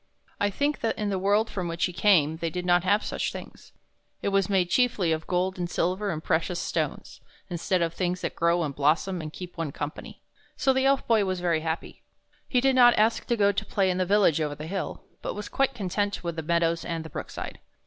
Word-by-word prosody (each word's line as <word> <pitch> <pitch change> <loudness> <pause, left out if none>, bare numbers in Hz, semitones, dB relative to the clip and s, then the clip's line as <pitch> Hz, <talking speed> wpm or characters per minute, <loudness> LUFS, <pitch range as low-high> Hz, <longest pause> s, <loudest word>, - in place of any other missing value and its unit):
I 205 - +2
think 285 +8 -1
that 225 -3 -1
in 210 -1 -1
the 190 - -1
world 205 +3 +2
from 180 -3 -4
which 170 0 0
he 180 - -4
came 170 -5 +3
they 165 0 -2
did 180 +2 -4
not 175 -1 +4
have 205 +3 +2
such - - -2
things: - - -10 0.5
it - - +1
was 195 -1 +1
made 185 -3 +2
chiefly 220 -9 +2
of 160 0 -2
gold 185 +1 0
and 175 -1 -2
silver 185 +5 0
and 160 -3 -3
precious 170 +2 0
stones, - - -3 0.3
instead 175 +1 0
of 165 0 -1
things 180 0 -2
that - - -3
grow 170 +1 +2
and 145 -3 -3
blossom 160 +5 +1
and 155 -1 -6
keep 180 +1 -9
one 160 -4 -2
company. 145 +2 -7 0.3
So 265 - +3
the 265 0 +1
Elf 275 0 +2
Boy 225 -3 +3
was 185 -1 -2
very 170 -2 +1
happy. 160 +1 -4 0.5
He 250 - +3
did 270 +1 +3
not 245 -1 +7
ask 220 +2 +2
to 235 - +1
go 200 -1 +4
to 200 - -2
play 190 -2 +1
in 180 - -2
the - - +3
village 195 -6 +4
over 150 -1 -1
the 150 - -7
hill, 190 +3 -4 0.2
but - - -4
was 210 0 -6
quite 270 -1 +1
content 205 -1 -2
with 170 -1 -3
the 160 - -3
meadows 170 +1 +1
and 165 -2 -4
the - - -7
brook - - -6
side. - - -7
180 Hz, 235 wpm, -27 LUFS, 165-205 Hz, 0.5 s, not